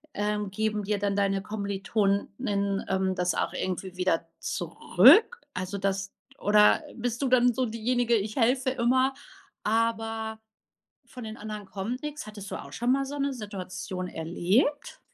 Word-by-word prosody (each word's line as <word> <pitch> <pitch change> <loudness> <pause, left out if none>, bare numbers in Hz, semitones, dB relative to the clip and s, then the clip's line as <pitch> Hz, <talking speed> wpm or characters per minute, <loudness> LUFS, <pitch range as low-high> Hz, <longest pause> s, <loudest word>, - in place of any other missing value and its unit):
ähm 210 -1 -1
geben 215 +1 -1
dir 210 +1 0
dann 200 -1 0
deine 195 -1 +1
Kommiliton:innen, 200 0 -1
ähm, 190 0 +1
das 180 -2 0
auch - - -1
irgendwie 185 0 -3
wieder 175 -3 +1
zurück? 480 -2 +4
Also 185 +2 -4
das 195 0 -1 0.2
d - - -22
oder 210 +1 +5
bist 240 +1 -3
du 270 - +1
dann 245 -1 +5
so 255 +1 0
diejenige: 235 +1 +1
„Ich 210 0 -1
helfe 255 +1 +2
immer, 260 +2 +2 0.5
aber 225 0 -1 0.7
von 250 - -10
den 220 +1 -6
anderen 210 -1 -7
kommt 205 +7 -4
nix?“ 300 -5 -5
Hattest 205 -2 -9
du - - -2
auch - - -9
schon 240 +2 +1
mal 275 0 +2
so 285 +2 -6
'ne 280 0 0
Situation 185 -4 -5
erlebt? 185 - 0
215 Hz, 155 wpm, -27 LUFS, 195-245 Hz, 0.7 s, oder